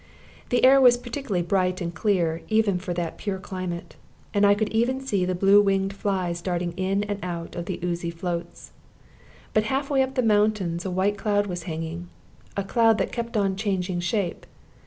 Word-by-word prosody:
The 245 Hz, +1 st, +3 dB
air 270 Hz, +1 st, +7 dB
was 245 Hz, -2 st, +7 dB
particularly 240 Hz, -6 st, -3 dB
bright 185 Hz, 0 st, +1 dB
and 170 Hz, -2 st, -3 dB
clear, 175 Hz, -5 st, 0 dB
even 215 Hz, -4 st, +2 dB
for 180 Hz, 0 st, -5 dB
that 170 Hz, -1 st, -3 dB
pure 200 Hz, -3 st, -2 dB
climate, 185 Hz, -2 st, -6 dB, 0.4 s
and 205 Hz, 0 st, +4 dB
I 200 Hz, -, +5 dB
could 215 Hz, +1 st, -1 dB
even 240 Hz, +4 st, +1 dB
see 205 Hz, -9 st, 0 dB
the 185 Hz, 0 st, -1 dB
blue 195 Hz, +3 st, +6 dB
winged 195 Hz, -1 st, +1 dB
flies 185 Hz, -4 st, -2 dB
darting 175 Hz, -1 st, -2 dB
in 190 Hz, +3 st, -1 dB
and 205 Hz, -1 st, -3 dB
out 170 Hz, -2 st, -5 dB
of 170 Hz, -1 st, -5 dB
the -, -, -3 dB
oozy 170 Hz, -1 st, -2 dB
floats. 170 Hz, 0 st, -5 dB, 0.8 s
But 215 Hz, 0 st, +2 dB
half 270 Hz, +5 st, -1 dB
way 270 Hz, -1 st, +4 dB
up 265 Hz, 0 st, -1 dB
the 255 Hz, -, +2 dB
mountains 205 Hz, -5 st, +1 dB
a -, -, -1 dB
white 190 Hz, +3 st, 0 dB
cloud 205 Hz, -2 st, +1 dB
was 175 Hz, -3 st, -4 dB
hanging, 165 Hz, +2 st, -5 dB, 0.5 s
a 200 Hz, -, 0 dB
cloud 225 Hz, +2 st, +3 dB
that -, -, -1 dB
kept 235 Hz, -1 st, -3 dB
on 195 Hz, -2 st, +1 dB
changing 190 Hz, -3 st, -1 dB
shape. 175 Hz, 0 st, -2 dB
195 Hz, 190 wpm, -25 LUFS, 175-215 Hz, 0.8 s, air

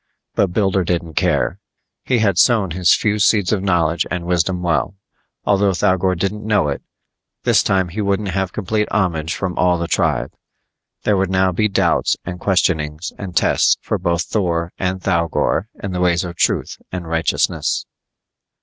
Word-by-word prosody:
But 100 Hz, -, +2 dB
Builder 95 Hz, 0 st, +1 dB
didn't 85 Hz, -1 st, -2 dB
care: -, -, 0 dB, 0.4 s
he 130 Hz, -, +1 dB
had 100 Hz, -6 st, +2 dB
sown 105 Hz, -6 st, +3 dB
his 90 Hz, 0 st, +4 dB
few 105 Hz, -1 st, 0 dB
seeds 105 Hz, -1 st, +3 dB
of 100 Hz, -, 0 dB
knowledge 85 Hz, -4 st, +1 dB
and 90 Hz, -1 st, -3 dB
wisdom 90 Hz, +1 st, 0 dB
well. 85 Hz, +3 st, 0 dB, 0.5 s
Although 100 Hz, -1 st, +3 dB
Thougor 95 Hz, +1 st, +2 dB
didn't 100 Hz, +4 st, -2 dB
know 105 Hz, -8 st, +1 dB
it, 70 Hz, -, -3 dB, 0.6 s
this -, -, +4 dB
time 95 Hz, -2 st, +1 dB
he 105 Hz, +6 st, -4 dB
wouldn't 100 Hz, 0 st, 0 dB
have 95 Hz, -1 st, -1 dB
complete 105 Hz, +2 st, -2 dB
homage 85 Hz, -6 st, 0 dB
from 95 Hz, -3 st, -3 dB
all 90 Hz, -1 st, +3 dB
the 85 Hz, 0 st, -3 dB
tribe. -, -, 0 dB, 0.7 s
There 105 Hz, -2 st, +2 dB
would 95 Hz, -1 st, 0 dB
now 95 Hz, 0 st, +2 dB
be 105 Hz, +5 st, +1 dB
doubts 100 Hz, -, +1 dB
and 90 Hz, 0 st, -6 dB
questionings 80 Hz, -4 st, 0 dB
and 95 Hz, -4 st, -5 dB
tests -, -, +3 dB
for -, -, -3 dB
both 85 Hz, 0 st, 0 dB
Thor 85 Hz, -5 st, -1 dB
and 95 Hz, 0 st, -1 dB
Thougor 85 Hz, +1 st, 0 dB, 0.2 s
in 100 Hz, -, -3 dB
the 90 Hz, 0 st, -2 dB
ways 90 Hz, -1 st, +2 dB
of 85 Hz, -1 st, -6 dB
truth -, -, 0 dB
and 90 Hz, -2 st, -5 dB
righteousness. 80 Hz, 0 st, 0 dB
90 Hz, 170 wpm, -19 LUFS, 85-100 Hz, 0.7 s, his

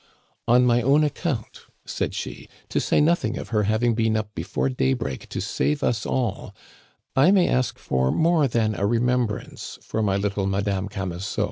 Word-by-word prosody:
"On 125 Hz, +2 st, +5 dB
my 120 Hz, 0 st, +3 dB
own 140 Hz, +5 st, +4 dB
account," 145 Hz, -5 st, -3 dB, 0.2 s
said -, -, -3 dB
she, -, -, -6 dB, 0.2 s
"to -, -, 0 dB
say -, -, +2 dB
nothing 150 Hz, -7 st, +2 dB
of -, -, -7 dB
her 105 Hz, -3 st, +1 dB
having 115 Hz, +2 st, +2 dB
been 110 Hz, -1 st, +1 dB
up 105 Hz, -1 st, -4 dB
before 85 Hz, +9 st, -2 dB
daybreak 125 Hz, -, -2 dB
to -, -, -4 dB
save 150 Hz, 0 st, -1 dB
us 110 Hz, -4 st, 0 dB
all, 120 Hz, -6 st, -2 dB, 0.6 s
I 135 Hz, +6 st, +5 dB
may 190 Hz, -2 st, +4 dB
ask 125 Hz, 0 st, 0 dB
for 65 Hz, 0 st, 0 dB
more 160 Hz, -3 st, +3 dB
than 115 Hz, -3 st, +1 dB
a 100 Hz, 0 st, 0 dB
remembrance 120 Hz, -1 st, -1 dB
for 110 Hz, -, -2 dB
my 100 Hz, -2 st, +1 dB
little 100 Hz, -1 st, -1 dB
Madame 100 Hz, 0 st, -1 dB
Camusot. 95 Hz, -1 st, -4 dB
115 Hz, 170 wpm, -24 LUFS, 100-130 Hz, 0.6 s, On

